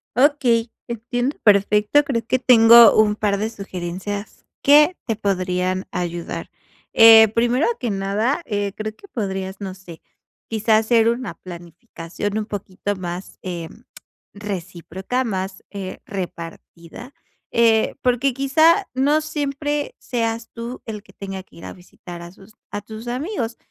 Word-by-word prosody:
Okey, 250 -4 +2 0.2
entiendo 245 +4 -3
perfecto, 210 +6 +4
creo 240 -5 -2
que 255 - +2
tengo 235 -2 +8
un 215 -1 +4
par 205 -2 0
de 220 +2 -1
sugerencias 195 0 -6 0.2
que 300 +5 +6
te 225 - 0
podrían 185 -2 -1
ayudar. 175 -1 -5 0.4
Eh, 225 -1 +9
primero 240 +5 +2
que 245 - -2
nada, 210 - -1
eh, 205 -3 -2
creo 215 0 -5
que 400 - -17
podrías, 190 - -4
no 195 -2 -5
sé, 180 -4 -13 0.5
quizá 220 0 +3
hacer 225 +1 +3
una 235 0 -3
planificación 175 +3 -7
un 215 - -2
poquito 205 -1 -4
más, 180 0 -7
em, 170 -3 -7 0.5
recíproca, 190 +3 -4
más, 190 -4 -4
eh, 195 -2 -6
repartida, 175 - -8 0.4
eh, 225 -1 +3
porque 250 +1 +1
quizá 315 +8 +3
no 285 +4 +2
siempre 295 -1 -3
seas 230 -2 -3
tú 235 +2 -7
el 215 -2 -6
que 195 -2 -21
tenga 195 -1 -7
que 185 - -22
ir 170 - -11
a - - -7
visitar 175 -1 -12
a 170 0 -10
sus 195 +3 -18 0.2
a 205 - -5
tus 220 +3 -10
amigos, 245 - -3
215 Hz, 140 wpm, -21 LUFS, 190-245 Hz, 0.5 s, Eh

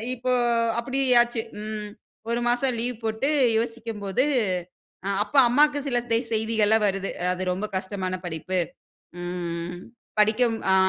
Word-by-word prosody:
இப்போ 255 +1 -1 0.5
அப்டி 260 +3 -1 0.2
ஆச்சு. 240 -1 0 0.2
ம் 215 -1 -5 0.4
ஒரு 235 +1 0
மாசம் 245 +1 +1
லீவ் 240 0 -2
போட்டு 220 +5 0 0.3
யோசிக்கும் 230 -2 -4
போது 195 +6 +2 0.8
அ - - 0
அப்ப 215 - -12
அம்மாக்கு 290 +3 +4
சில 245 - +1
தே 230 - +4 0.2
செய்திகள்லாம் 220 -1 +2
வருது. 195 0 -1 0.2
அது 185 +1 -4
ரொம்ப 190 +4 -3
கஷ்டமான 190 -1 -3
படிப்பு. 175 +2 -2 0.6
ம். 175 -1 -4 0.4
படிக்கும் 225 +2 +3 0.2
ஆ - - +6
220 Hz, 130 wpm, -25 LUFS, 190-240 Hz, 0.8 s, ஆ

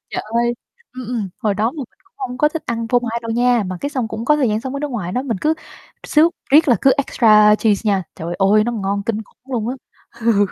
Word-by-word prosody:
Trời - - -3
ơi, 235 +2 0 0.4
ừm, 255 -2 -8
ừm, 225 -5 -3
hồi 210 -2 0
đó 220 +4 0
mà - - -15
mình 275 - -8
cũng 385 - -32
hông 255 -1 -5
có 300 - +4
thích 320 +1 -5
ăn 230 -1 -3
phô 245 - +4
mai 235 -1 -3
đâu 230 - -5
nha, 240 0 +2
mà 185 0 -4
cái 285 - -3
xong 255 -6 -2
cũng 220 +1 -5
có 300 +3 +4
thời 265 -5 +1
gian 215 0 0
sống 260 +2 -6
ở - - -2
nước 295 -1 -3
ngoài 195 -8 -4
đó, 255 - -1
mình 235 -7 -2
cứ 310 +1 +2 0.5
xước 320 +3 +4 0.2
riết 300 +1 +6
là 240 - +5
cứ 270 - +5
extra 215 -6 +5
cheese 210 -2 +1
nha, 195 -2 +2
trời 170 +2 -5
ơi, 205 +2 +4
nó 240 - -1
ngon 200 -2 -2
kinh 220 -1 -1
khủng 255 +5 -17
luôn 230 -1 -1
á. 255 - -2 0.5
Ừ. 220 -3 +3
235 Hz, 270 wpm, -19 LUFS, 215-260 Hz, 0.5 s, riết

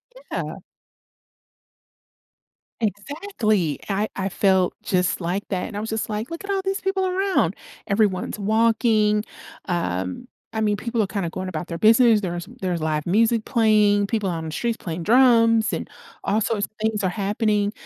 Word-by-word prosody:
Mhm. - - -15 0.3
Yeah. - - -9 2.2
Exactly! 215 - -1
I 205 +2 0
I 195 0 -2
felt 190 -1 +2
just 180 0 +1
like 180 +4 -1
that 185 -3 -2
and 210 - -8
I - - -2
was 220 - -4
just 220 0 -2
like, 215 +6 -4
"Look 335 +4 -6
at 400 - -5
all 390 -1 0
these 390 +1 -1
people 385 -1 0
around!" 385 +1 +1 0.3
Everyone's 200 -1 +1
walking, 215 0 +2 0.4
um, 95 - -2 0.2
I 220 - -2
mean, 210 -1 +1
people 235 -1 -1
are - - 0
kinda 195 -5 -2
going 185 +1 -5
about 170 -1 -4
their 170 - -5
business, 225 0 +5
there's 175 -1 -4
there's 180 -3 -1
live 155 -1 -1
music 225 +4 +2
playing, 210 -3 +3
people 210 -4 -1
out 165 - -2
on 160 - -5
the 160 - -5
streets 235 +5 -1
playing 165 -1 -5
drums, 230 -1 +4
and - - -3 0.3
all 210 +2 +1
sorts 205 -1 0
of - - -38
things 220 -1 0
are 185 - +2
happening, 205 +1 0
210 Hz, 170 wpm, -23 LUFS, 185-230 Hz, 2.2 s, business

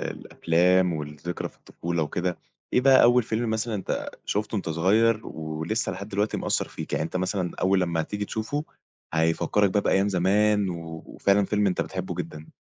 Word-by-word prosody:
الأفلام 90 +2 +1
والذكرى 75 +2 -5
في - - -24
الطفولة 85 -1 -3
وكده، 90 +4 -2 0.3
إيه - - +4
بقى 135 0 +6
أول 120 +1 +6
فيلم 110 +1 -1
مثلًا 110 +1 -1
أنت 100 - -3
شفتُه 105 +2 -2
وأنت 100 -5 -2
صغير 105 +7 +2
ولسه 80 +7 -3
لحد 100 +2 -7
دلوقتي 105 +1 0
مأثّر - - -1
فيك؟ - - -8
يعني - - 0
أنت 80 - -4
مثلًا 90 -1 -1
أول 95 0 +3
لمّا 85 -2 0
هتيجي 105 +5 -3
تشوفُه 110 +9 -3 0.5
هيفكّرك 80 +5 +2
بقى 105 - +2
بأيام 100 0 +2
زمان 100 +2 +2
و 80 -2 -6
وفعلًا 100 0 +2
فيلم 105 +1 +1
أنت 90 - +1
بتحبه 95 -1 -4
جدًا؟ 80 -3 -6
95 Hz, 170 wpm, -26 LUFS, 85-105 Hz, 0.5 s, بقى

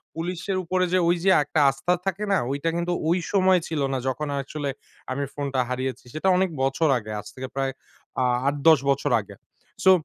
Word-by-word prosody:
পুলিশের 180 +3 -3
উপরে 185 +1 +1
যে 185 - +4
ওই 175 - +4
যে 195 - +5
একটা 150 +2 -1
আস্থা 135 +6 0
থাকে 195 +2 -2
না? - - +4
ওইটা 145 +4 -1
কিন্তু 170 +1 -1 0.2
ওই 175 +2 +3
সময় 190 -2 +4
ছিল 160 -3 -2
না - - 0
যখন 150 +3 -2
অ্যাকচুয়ালি 140 +1 -3 0.4
আমি 140 +2 -1
ফোনটা 140 -2 -2
হারিয়েছি, 130 0 -3
সেটা 155 +5 -1
অনেক 190 0 +2
বছর 135 +4 +2
আগে 110 -2 -7
আজ - - -9
থেকে 130 0 -5
প্রায় 135 -1 0 0.5
আ - - +2 0.2
৮-১০ 145 +2 +5
বছর 140 +1 +1
আগে। 100 - -13 0.5
সো 190 - +8
150 Hz, 190 wpm, -25 LUFS, 135-180 Hz, 0.5 s, সো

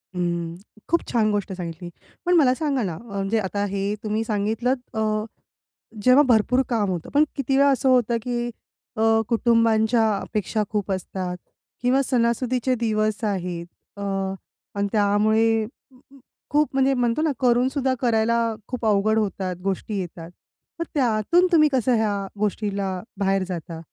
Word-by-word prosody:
उम्म, 170 -1 -2 0.3
खूप 335 +1 +3
छान 215 -3 +2
गोष्ट 205 -1 -2
सांगितली. 175 -1 -6 0.4
पण 355 - +3
मला 275 -7 +5
सांगा 280 -4 -1
ना 180 -5 -2
अ, - - -8 0.2
म्हणजे 200 +3 0 0.3
हे 200 +1 -1
तुम्ही 215 +1 -1
सांगितलंत 225 +4 -2
अ, 215 -1 0 0.8
जेव्हा 255 +3 +6
भरपूर 245 +2 +3
काम 220 -5 +1
होतं. 175 -3 -4
पण 290 +1 +5
किती 270 0 0
वेळा 280 +1 +5
असं 270 0 +2
होतं 245 -2 +3
की 240 -1 -2 0.5
अ, - - -1 0.3
कुटुंबांच्या 230 -1 +3
अपेक्षा 215 +2 -2
खूप 205 -2 -2
असतात 185 -1 -4 0.4
किंवा 255 +2 +3
सणासुदीचे 250 0 +1
दिवस 215 -1 -1
आहेत. 180 -4 -2 0.3
अ, - - -7 0.7
आणि 200 0 0
त्यामुळे 215 +1 +2 0.9
खूप 300 +1 +3
म्हणजे 270 0 +3
म्हणतो 245 +2 +1
ना 315 -2 +2
करूनसुद्धा 260 +2 +2
करायला 235 -1 +2 0.3
खूप 245 -2 -4
अवघड 215 +1 +3
होतात, 190 -3 -2
गोष्टी 195 +2 -2
येतात, 170 -2 -7 0.5
तर - - 0
त्यातून 265 - +2
तुम्ही 305 -3 +5
कसं 255 -2 +2
ह्या 205 -3 -1
गोष्टीला 200 -2 -1 0.2
बाहेर 195 -1 +1
जाता? 170 -2 -6
220 Hz, 140 wpm, -23 LUFS, 200-250 Hz, 0.9 s, जेव्हा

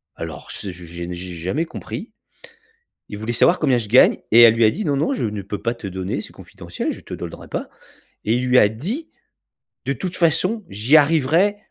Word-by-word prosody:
Alors 80 -2 -7
c'est 95 -3 -5
je 85 0 -12
j'ai 85 +1 -7
ne 90 - -5
j'ai 90 +1 -7
jamais 95 - -2
compris. 210 +6 -7 1.0
Il 105 - -6
voulait 110 +3 -3
savoir 175 +9 +4
combien 135 -5 +3
je 115 -3 -4
gagne 125 +4 +6
et 115 +2 +8
elle 115 -1 +9
lui 115 - +3
a - - +6
dit: 215 - -4
«Non, 145 -3 +1
non, 145 +4 0
je 125 - -2
ne 105 -2 -3
peux 100 +2 -6
pas 115 - 0
te 115 -4 -7
donner, 95 0 -3
c'est - - -11
confidentiel, - - -6
je - - -8
te - - -10
donnerai - - -7
pas» - - -5 0.6
et 110 - +2
il 125 +1 -1
lui 125 0 +4
a 105 - +6
dit: 200 - -5 0.8
«De 140 - +1
toute 175 +7 -5
façon, 185 +6 +1
j'y 110 +9 +3
arriverai 160 +6 +3
120 Hz, 220 wpm, -21 LUFS, 100-160 Hz, 1.0 s, elle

